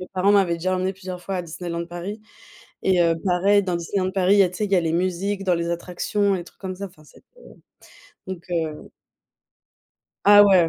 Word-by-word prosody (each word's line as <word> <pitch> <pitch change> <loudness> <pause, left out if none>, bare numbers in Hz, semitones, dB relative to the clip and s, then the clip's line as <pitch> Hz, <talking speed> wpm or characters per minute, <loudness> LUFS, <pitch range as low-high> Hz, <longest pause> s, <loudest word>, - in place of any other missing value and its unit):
Mes 185 - -8
parents 190 +2 +3
m'avaient 190 -4 +4
déjà 185 +3 -1
emmenée 185 +1 -1
plusieurs 185 -1 -8
fois 195 - -3
à 180 - -2
Disneyland 170 0 -5
Paris 175 +5 -6 0.6
et 185 -2 +3
heu, 165 -1 +3
pareil, 195 +3 +3
dans 180 -2 -1
Disneyland 185 +2 -1
Paris, 190 +1 +3
il - - +4
y - - +8
a 180 - +1
tu 180 - -9
sais, 210 - 0
il 200 - -7
y - - +5
a 180 - +5
les 165 -1 -1
musiques 185 +3 -1
dans 180 -2 +2
les 170 0 -2
attractions, 190 +3 -1
les 175 - -4
trucs - - -19
comme 185 -1 -4
ça, 200 +2 -5
enfin, 175 -5 -15
c'était - - -20 1.0
donc, 185 -2 -6
heu 160 -3 -3 1.3
Ah 205 0 +9
ouais, 185 -5 +5
185 Hz, 220 wpm, -23 LUFS, 170-195 Hz, 1.3 s, Ah